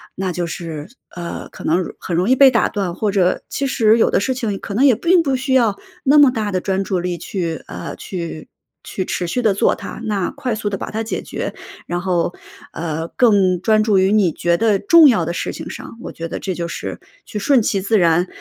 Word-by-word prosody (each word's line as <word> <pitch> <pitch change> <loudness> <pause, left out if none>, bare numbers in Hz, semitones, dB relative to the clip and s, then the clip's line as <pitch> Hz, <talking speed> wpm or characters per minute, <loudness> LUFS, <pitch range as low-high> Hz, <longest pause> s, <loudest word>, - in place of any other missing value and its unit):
那 185 -1 -2
就 175 0 -2
是， 160 -3 -6 0.3
呃， 170 -1 -6
可 - - -12
能 170 +3 +2
容 - - -6
很 175 - -3
容 180 +7 +1
易 260 - +5
被 270 0 +7
打 230 - +2
断， 190 -4 -2
或 210 -2 -1
者 185 -2 +1
其 280 - -2
实 225 -3 +3
有 - - +3
的 - - +3
事 260 +5 -1
情 215 -6 -3
可 200 - -6
能 265 +6 +4
也 260 - +6
并 345 - +3
不 270 -3 0
需 260 +1 -1
要 225 -6 +3 0.3
那 290 +2 +5
么 285 -3 +7
大 215 -4 -2
的 185 -1 -1
专 195 0 -1
注 185 -2 -1
力 175 0 -3
去 165 -2 -4
呃， - - -7
去 170 -4 -6 0.4
去 185 - -4
持 180 - -2
续 250 +9 -1
地 220 -4 +3
做 - - +3
它。 - - -8
那 205 -5 -1
快 250 -3 -3
速 210 -1 -3
地 195 - -3
把 - - -6
它 220 - -2
解 225 - -3
决， - - -5 0.3
然 175 0 -2
后， 180 - 0 0.4
呃， 160 0 -3
更 195 -7 +3
专 215 +2 +3
注 210 -3 +2
于 190 +1 +3
你 200 -6 +3
觉 170 +2 0
得 215 -2 +2
重 330 -4 +7
要 195 -9 +2
的 170 - -3
事 - - -3
情 - - -7
上， 230 - -9
我 - - -7
觉 165 - -6
得 - - -5
这 190 - -3
就 170 -1 -3
是 - - -6 0.3
去 210 - -5
顺 260 +3 +3
其 195 -2 0
自 215 +3 +2
然， 170 +1 +3
195 Hz, 255 characters per minute, -19 LUFS, 175-230 Hz, 0.4 s, 被